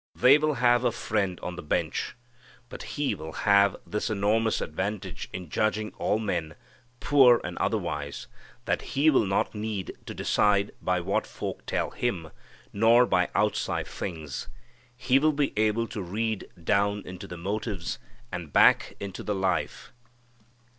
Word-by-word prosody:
They 135 +4 +6
will 155 -1 +1
have 120 0 +3
a 120 - +3
friend 105 -5 -1
on 90 0 -5
the - - -5
bench. 75 - -2 0.5
But - - -8
He 145 -1 +1
will 80 +1 -7
have 100 -1 +4
this 105 +3 -2
enormous 110 +2 +1
advantage 95 -1 -4
in 90 -1 -6
judging 110 0 0
all 105 - +1
men, 85 -8 -2 0.4
poor 130 -5 +6
and - - -5
otherwise, 75 -1 -2 0.4
that - - 0 0.2
He 155 +3 +5
will 115 -7 +3
not 95 - 0
need 105 -3 -4
to - - -6
decide 100 -1 +2
by 90 -1 0
what 95 +3 -1
folk - - -6
tell - - -1
Him, 90 -10 -2 0.4
nor 115 +4 +5
by - - +2
outside - - 0
things. 80 -7 -6 0.5
He 130 +1 +3
will 155 +2 +3
be 145 -1 0
able 110 +2 +2
to 105 - -5
read 110 +4 -2 0.2
down 100 +3 +1
into 90 -1 -8
the 90 - -8
motives 100 0 -3 0.3
and 85 -4 -6
back - - +5
into 100 -2 -6
the 105 - -2
life. 95 -1 -2
105 Hz, 155 wpm, -27 LUFS, 90-115 Hz, 0.5 s, They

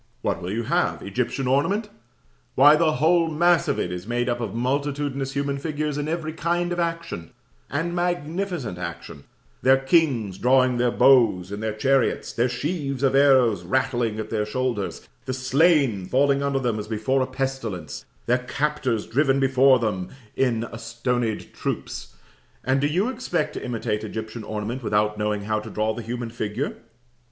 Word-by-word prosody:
What - - -1
will 90 - -4
you 115 +3 -1
have? - - 0
Egyptian 135 - -2
ornament? 190 - +1 0.7
Why, 145 +3 +8
the 155 0 +2
whole 165 +2 +3
mass 170 +2 +3
of - - 0
it 90 - -2
is 90 +2 -6
made 120 +1 0
up 120 0 -1
of 115 -3 -4
multitudinous 140 +2 -1
human 140 0 -1
figures 150 0 -2
in 145 0 -2
every 160 -1 -3
kind 175 +2 -1
of 175 - -2
action 165 - -3 0.4
and 165 +4 -2
magnificent 175 - -2
action; 85 -4 -7 0.4
their 130 +1 +5
kings 135 - +1
drawing 130 0 +3
their 120 0 +2
bows 115 -9 +4
in 100 - -4
their 110 0 -2
chariots, 135 +2 +1
their 120 +2 +1
sheaves 140 +1 -3
of 135 - +3
arrows 130 -8 +5
rattling 120 +1 0
at 110 0 -5
their 110 -2 0
shoulders; 105 -6 -3 0.2
the 130 -1 -2
slain 130 - +2
falling 140 +4 +2
under 140 -1 0
them 120 -5 -1
as 105 - -6
before 115 +5 0
a 130 - 0
pestilence; 130 - -4 0.2
their 125 +2 +2
captors 130 -3 -1
driven 135 +3 +2
before 135 0 +5
them 105 -6 -2 0.3
in 120 -4 +1
astonied 115 0 -3
troops; - - -5 0.5
and 130 +1 +1
do 145 - +3
you 180 +9 +1
expect 225 -11 -2
to - - -6
imitate 110 -3 -2
Egyptian 110 +1 -6
ornament 110 +4 -4
without 105 -2 0
knowing 105 -1 -1
how 110 +1 0
to 110 +1 -8
draw 110 +1 -1
the 120 - -6
human 120 +1 -5
figure? 115 +3 -3
130 Hz, 165 wpm, -24 LUFS, 110-145 Hz, 0.7 s, Why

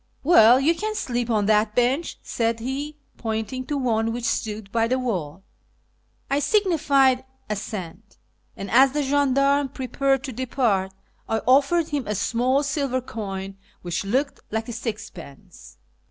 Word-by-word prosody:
" - - -42
Well, 250 -6 +7
you 300 +5 +3
can 430 +5 -3
sleep 245 - -2
on 215 -3 +1
that 210 0 +2
bench," 255 +7 +1
said 230 -1 -1
he, 280 +5 -4 0.2
pointing 225 +3 -4
to 295 - -1
one 225 -4 0
which 240 +1 -5
stood 210 -3 -2
by 230 0 +1
the 255 +2 +1
wall. 190 - -3 0.8
I 275 +1 +1
signified 290 - +3 0.3
assent, 205 -1 -6 0.4
and, 195 -1 -6
as 265 +2 +6
the 295 0 0
gendarme 280 0 +2
prepared 270 +1 -1
to 270 - -5
depart, 230 -6 0 0.4
I 225 - +1
offered 285 +6 +3
him 290 -3 -2
a 210 - -1
small 250 +7 +1
silver 275 -2 -1
coin 195 -5 -6 0.3
which 175 +1 -2
looked 260 +8 -1
like 220 +1 -3
a 240 - -5
sixpence. 210 - -8
245 Hz, 150 wpm, -24 LUFS, 220-275 Hz, 0.8 s, Well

